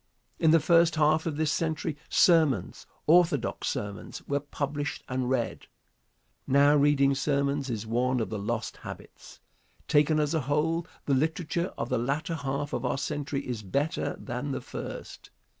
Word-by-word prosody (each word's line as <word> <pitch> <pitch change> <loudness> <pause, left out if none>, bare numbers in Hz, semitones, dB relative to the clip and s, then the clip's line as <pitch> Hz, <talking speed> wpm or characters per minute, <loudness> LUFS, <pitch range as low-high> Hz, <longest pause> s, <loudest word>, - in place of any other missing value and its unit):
In 160 - +4
the 165 +1 +6
first 165 +1 +4
half 155 +1 +3
of 150 -3 -2
this 155 -1 +1
century, 160 -2 -1
sermons, 155 - +3 0.2
orthodox 165 -5 +3
sermons, 100 -1 -5
were 140 0 +1
published 145 +1 -4
and 130 -1 -2
read. 125 -3 -2 0.8
Now 140 +2 +5
reading 140 -1 +4
sermons 140 0 0
is 110 -2 -3
one 125 +3 +1
of 110 - -3
the 110 - -3
lost 110 +3 -3
habits. - - -11 0.5
Taken 150 +1 +3
as 150 +1 +1
a 160 - +1
whole, 160 +5 0 0.2
the 140 - +1
literature 160 +5 0
of - - -3
the - - +1
latter 145 +7 -1
half 140 -1 -3
of 120 - -2
our 125 +1 0
century 145 -1 -3
is 120 -4 -3
better 140 - -1
than 135 +3 -4
the - - -3
first. - - -8
145 Hz, 160 wpm, -28 LUFS, 130-155 Hz, 0.8 s, the